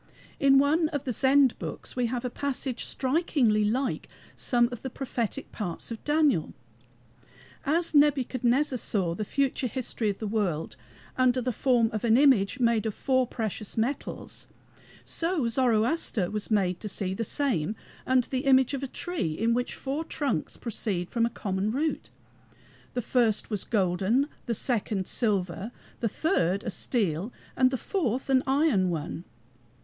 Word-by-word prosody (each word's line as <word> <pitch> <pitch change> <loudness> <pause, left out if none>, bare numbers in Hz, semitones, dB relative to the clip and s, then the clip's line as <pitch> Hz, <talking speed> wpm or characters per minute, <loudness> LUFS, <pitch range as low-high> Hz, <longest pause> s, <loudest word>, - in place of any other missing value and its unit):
In 275 -1 +6
one 305 +4 +3
of 290 -4 -3
the 250 - -2
Zend 265 0 +4
books - - -6
we 250 -1 +1
have 245 +1 -3
a - - 0
passage 265 -2 -3
strikingly 260 -6 +1
like 250 +5 -1 0.3
some 240 -1 +2
of 245 - -6
the 265 - -4
prophetic 255 -1 -4
parts 180 0 -5
of 225 - -6
Daniel. 295 - +2 1.1
As 330 +3 +1
Nebuchadnezzar 270 -2 +3
saw 185 -7 0
the 215 - -3
future 270 +3 0
history 240 -3 -2
of 200 - -2
the 220 - -5
world 200 -7 -1 0.4
under 255 0 +3
the 250 0 -1
form 240 -2 +2
of 215 - -3
an 230 0 +4
image, 260 -9 +4
made 230 -3 +2
of 215 - -3
four 260 -2 +1
precious 220 -3 -4
metals, 250 +6 -3 0.6
so 330 -6 0
Zoroaster 230 - +1
was 210 -1 -3
made 190 -5 +1
to 210 - -5
see 190 -1 -2
the 230 - -2
same 220 - 0 0.3
under 255 -2 +3
the 260 +1 -2
image 265 0 +5
of 275 - -2
a 275 - -3
tree 280 - -2
in 230 +2 +2
which 245 +1 -1
four 280 +4 -3
trunks 285 - -2
proceed 195 -6 -2
from 230 -1 +2
a - - -4
common 200 -2 -2
root. 275 - -2 0.9
The 245 - -1
first 230 -3 +1
was 205 -3 -2
a - - -29
golden, 205 - +2 0.2
the 235 - 0
second 210 -5 0
a - - -7
silver, 200 -2 -1 0.3
the 230 - 0
third 195 - 0
a 225 - -3
steel, 195 - -1 0.2
and 255 0 +4
the 260 - -2
fourth 265 - -2
an 260 -1 +5
iron 270 - +3
one. 165 +1 -4
240 Hz, 165 wpm, -27 LUFS, 210-270 Hz, 1.1 s, In